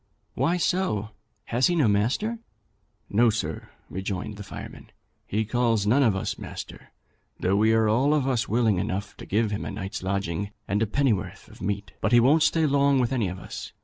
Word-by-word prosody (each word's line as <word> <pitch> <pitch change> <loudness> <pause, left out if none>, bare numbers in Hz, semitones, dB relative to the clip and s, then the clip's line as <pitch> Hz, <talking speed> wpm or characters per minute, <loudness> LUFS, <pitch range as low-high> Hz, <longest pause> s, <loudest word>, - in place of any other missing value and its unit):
'Why 175 +2 +1
so? 165 - 0 0.3
Has 125 +2 +2
he 175 - +1
no 150 -8 +3
master?' 125 - +1 0.7
'No, 115 +3 +4
sir,' 80 -8 -3 0.2
rejoined 95 +2 -4
the 105 - -7
fireman; - - -9 0.4
'he 110 +2 0
calls 115 -2 +1
none 120 +7 +4
of 115 -7 +3
us 95 - -3
master, - - -8 0.5
though 95 +2 +1
we 110 +2 +4
are 110 -1 +3
all 130 +8 +3
of 140 -3 +1
us 125 -4 0
willing 110 -4 +2
enough 100 +3 -3
to - - -10
give 110 +1 +1
him 105 - -3
a - - -4
night's 100 0 -5
lodging 95 0 -2 0.2
and 100 +2 0
a 110 - +2
pennyworth 125 -3 -1
of - - -15
meat. 100 0 -3
But - - +1
he 120 - +8
won't 140 +7 +4
stay 160 0 +3
long 140 -1 +3
with 125 0 +1
any 115 -6 +1
of 90 +1 -5
us. - - -8
110 Hz, 195 wpm, -26 LUFS, 100-130 Hz, 0.7 s, he